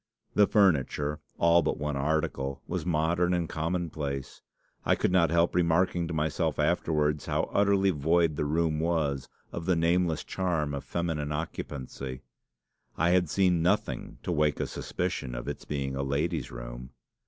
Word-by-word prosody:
The 105 -1 +5
furniture, 75 -6 +2 0.2
all 85 +1 +5
but - - -1
one 75 -1 -2
article, 70 -2 -1
was - - -3
modern 85 +2 +2
and 85 -2 -1
commonplace. 80 -5 -3 0.4
I - - +3
could - - 0
not 90 -3 +4
help 85 +1 +2
remarking 85 0 +2
to 85 - -4
myself 75 0 0
afterwards 75 -2 +1
how - - -1
utterly 100 -1 +3
void 80 +1 +2
the 75 - -1
room 80 +1 +1
was 75 -5 0 0.2
of 85 -1 -5
the 90 - +4
nameless 85 0 +1
charm 85 -6 -1
of 70 - -4
feminine 80 -4 -2
occupancy. 70 -4 -5 0.7
I 85 +2 +3
had 90 -3 +3
seen 90 -2 +3
nothing 85 - 0
to - - -2
wake 75 -3 +1
a - - 0
suspicion 60 -2 -3
of - - -6
its - - -5
being 70 -2 -3
a 70 - -1
lady's 70 +4 -1
room. - - -8
80 Hz, 155 wpm, -28 LUFS, 70-85 Hz, 0.7 s, The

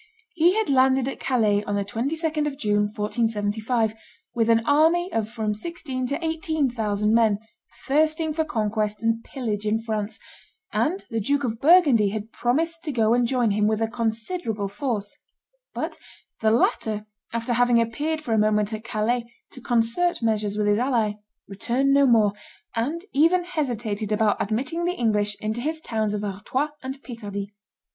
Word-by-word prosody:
He 350 +3 +3
had 440 - +1
landed 265 -1 +3
at 270 - -4
Calais 215 -5 +2
on 205 - -1
the 200 -1 -1
22d 300 - -1
of 280 -2 -4
June, 210 -5 +1
1475, 220 +1 0 0.4
with 230 -2 +1
an 230 0 +4
army 330 +6 +3
of 220 -1 -1
from 220 -2 -2
sixteen 260 - -4
to 290 +6 -3
eighteen 315 -4 0
thousand 210 -2 0
men 225 -3 +4 0.5
thirsting 310 +2 +2
for 320 +1 +1
conquest 215 -5 -1
and 230 0 +1
pillage 215 -6 -3
in 215 +1 +1
France, 215 -2 -3 0.6
and 360 +6 0
the 225 - 0
Duke 280 +7 0
of 225 -3 -3
Burgundy 285 - +6
had 215 +2 -5
promised 325 +9 -1
to 300 - -1
go 225 -3 +2
and 245 0 +3
join 245 -3 +1
him 210 +1 +2
with 215 0 +1
a 225 - +1
considerable 225 - -2
force; 205 -1 -3 0.5
but - - -4 0.4
the 220 - +3
latter, 215 -1 +1 0.3
after 230 +1 -1
having 245 0 +4
appeared 300 +8 -1
for 235 - -1
a 220 - +3
moment 210 0 +2
at 220 0 -5
Calais 230 +2 -1 0.2
to 255 - -12
concert 240 +8 +1
measures 210 -2 0
with 210 - +1
his 205 +1 +3
ally, 235 -5 +1 0.3
returned 245 +7 0
no 280 0 +5
more, 220 -4 +4 0.4
and 295 +11 -2
even 330 +5 +4
hesitated 235 - -3
about 210 -1 +2
admitting 275 +11 -1
the 355 +1 0
English 210 -3 +1
into 220 +2 -3
his 315 +4 -2
towns 220 -7 -1
of 210 - -3
Artois 210 +9 -2
and 265 +1 -7
Picardy. 205 -4 -6
230 Hz, 165 wpm, -24 LUFS, 215-280 Hz, 0.6 s, Burgundy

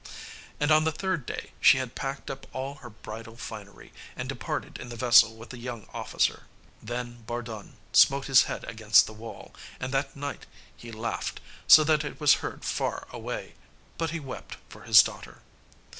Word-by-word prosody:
And 145 +1 +2
on 155 0 +6
the 160 - +1
third 175 -3 -2
day - - -6
she - - +7
had 130 -2 -3
packed 135 0 -5
up 135 0 -9
all 135 +1 -3
her 120 - -9
bridal 110 +1 -10
finery, 105 -5 -10 0.2
and - - -5
departed - - -4
in 120 - -8
the 120 - -7
vessel 115 -1 +6
with 115 +1 -12
the 125 - -9
young 120 -3 -6
officer. - - -1 0.3
Then 120 0 -6
Bardun 115 -3 -6 0.2
smote 140 0 +5
his 130 -2 +6
head - - -5
against 110 -1 +4
the 110 - -9
wall, 110 +1 -10 0.3
and 130 +1 -4
that 135 0 -1
night 145 0 -6 0.3
he 120 - -11
laughed, 115 +1 -4 0.3
so 155 - +10
that 155 0 +2
it 145 - -7
was 150 -2 +6
heard - - -6
far - - -2
away, - - -6 0.5
but 165 -1 0
he 170 +2 -3
wept 135 -4 -8
for - - -13
his - - +9
daughter. - - -9
125 Hz, 180 wpm, -27 LUFS, 115-140 Hz, 0.5 s, so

